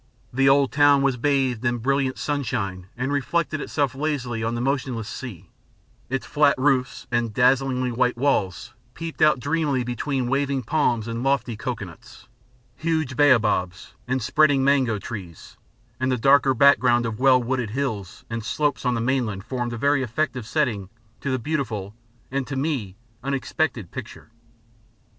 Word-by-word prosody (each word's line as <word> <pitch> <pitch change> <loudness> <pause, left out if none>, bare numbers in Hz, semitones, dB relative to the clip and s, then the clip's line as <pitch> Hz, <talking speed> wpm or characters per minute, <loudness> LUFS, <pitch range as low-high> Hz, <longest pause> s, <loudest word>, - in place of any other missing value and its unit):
The 135 +2 +4
old 140 -1 +4
town 145 -1 +5
was 135 -2 +2
bathed 130 -2 0
in 120 0 +1
brilliant 135 +2 0
sunshine 110 -11 -3
and 125 +3 -2
reflected 150 +2 -1
itself 145 -3 -1
lazily 130 -5 -2
on 115 +1 -1
the - - -3
motionless 130 -4 -2
sea; 100 -8 -8 0.6
its 135 +1 -2
flat 145 -1 +3
roofs 130 -1 +1
and 120 -2 0
dazzlingly 130 0 +2
white 125 +1 +1
walls 120 -9 0 0.2
peeped 165 -1 -6
out 150 -4 +5
dreamily 145 -2 0
between 125 +2 -2
waving 135 0 0
palms 120 -4 0
and 115 0 -3
lofty 135 -3 0
cocoanuts, - - -7 0.5
huge 160 -5 -1
baobabs 110 -10 +2
and 130 -1 -1
spreading 145 0 +3
mango 135 -5 +3
trees; 95 -6 -9 0.4
and 130 0 0
the 125 - +1
darker 135 +2 +4
background 125 -2 +5
of 110 -2 -4
well 130 -1 +5
wooded 125 -2 -2
hills 110 -6 -4
and 115 -1 -4
slopes 145 +3 -1
on 125 - +2
the 115 - -1
mainland 115 -6 -1
formed 120 0 -3
a 120 - -4
very 140 +3 +2
effective 130 -1 -2
setting 115 -12 -1 0.3
to 140 - -3
a 130 - +1
beautiful 115 -8 -3 0.4
and, 135 -1 -2
to 135 - -4
me, 135 -9 -2 0.3
unexpected 135 - -2
picture. - - -9
130 Hz, 150 wpm, -24 LUFS, 115-140 Hz, 0.6 s, town